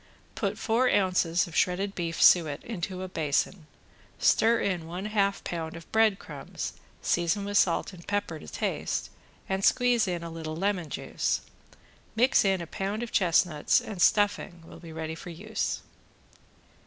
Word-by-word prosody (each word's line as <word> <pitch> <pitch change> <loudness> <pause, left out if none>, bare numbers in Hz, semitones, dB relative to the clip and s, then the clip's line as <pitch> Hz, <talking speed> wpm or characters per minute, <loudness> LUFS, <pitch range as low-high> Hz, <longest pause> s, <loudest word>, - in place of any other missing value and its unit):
Put - - -2
four 240 +3 +2
ounces 180 -4 +2
of 170 - -10
shredded 195 +2 +1
beef 170 -3 -3
suet 155 -5 +5
into 185 -4 -4
a - - -4
basin, 160 0 -1 0.5
stir 230 +1 +4
in 180 -5 -1
one 180 +4 -5
half 200 -2 0
pound 165 -1 -4
of 165 - -11
bread 220 -3 +4
crumbs, - - -7 0.3
season 175 +4 +1
with 205 0 +2
salt 175 +2 +1
and 175 -2 -13
pepper 205 -6 -2
to - - -12
taste, - - -2 0.4
and 190 0 -1
squeeze 245 -2 +3
in 175 -2 -2
a 170 - -6
little 160 -1 -5
lemon 185 -2 -1
juice. - - -1 0.7
Mix 250 +4 +4
in 190 -2 +2
a - - -4
pound 200 +6 -3
of 235 - -6
chestnuts 175 -5 +3
and 200 -5 -6
stuffing 200 -5 +2
will - - -12
be 165 -2 -11
ready 160 0 -4
for 165 +2 -9
use. 210 +6 -3
185 Hz, 160 wpm, -28 LUFS, 165-205 Hz, 0.7 s, suet